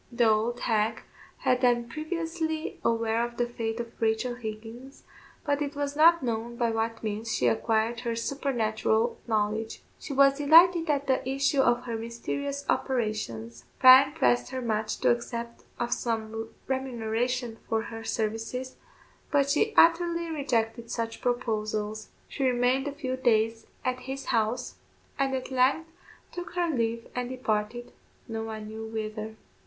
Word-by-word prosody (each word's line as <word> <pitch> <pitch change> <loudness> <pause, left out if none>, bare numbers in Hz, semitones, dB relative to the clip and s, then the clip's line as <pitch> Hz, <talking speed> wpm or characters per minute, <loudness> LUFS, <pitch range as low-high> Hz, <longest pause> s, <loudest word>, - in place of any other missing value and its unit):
The 235 -1 +3
old 220 +3 +1
hag 215 -1 0 0.3
had 250 - +1
been 240 -2 +2
previously 320 +2 -3
aware 230 0 +1
of 240 0 -5
the 240 - +2
fate 230 -1 -4
of 235 -1 -7
Rachel 225 +2 +1
Higgins, 235 +3 -8 0.4
but 285 -1 0
it 285 -1 -2
was 285 0 -2
not 335 +1 +6
known 235 0 -2
by 235 -1 +1
what 225 0 -2
means 220 +1 -3
she 125 - 0
acquired 220 - +1
her 235 -1 -2
supernatural 230 -3 0
knowledge. 220 0 -1 0.2
She - - -8
was 275 0 +4
delighted 330 +3 +6
at 285 -1 +1
the 260 -1 0
issue 275 +1 +2
of 240 -1 +2
her 235 -2 -4
mysterious 275 +5 -4
operations. 215 - -2
Bryan 265 +2 +8
pressed 270 -6 +2
her 260 - -4
much 220 -3 -1
to - - +5
accept 235 0 -4
of 240 0 0
some 225 -1 -3 0.2
remuneration 245 -2 -2
for 225 0 +1
her 225 -1 -7
services, 225 +4 -3 0.5
but 280 -2 +2
she 435 +9 +2
utterly 335 0 +4
rejected 235 -6 -1
such 230 -1 -3
proposals. 215 -3 -2 0.2
She 275 - -4
remained 255 +1 +2
a - - -2
few 260 -3 -4
days 225 -2 +1 0.2
at 255 0 0
his 270 +2 -6
house, 230 +2 -1 0.4
and 270 -1 +1
at 260 0 -5
length 275 +6 +2 0.4
took 350 -1 -7
her 350 -2 0
leave 230 -1 -1
and 250 0 -3
departed, 240 -1 -2 0.4
no 225 -2 -4
one 220 -1 -6
knew 220 +1 -7
whither. 215 0 -5
240 Hz, 150 wpm, -28 LUFS, 225-270 Hz, 0.5 s, Bryan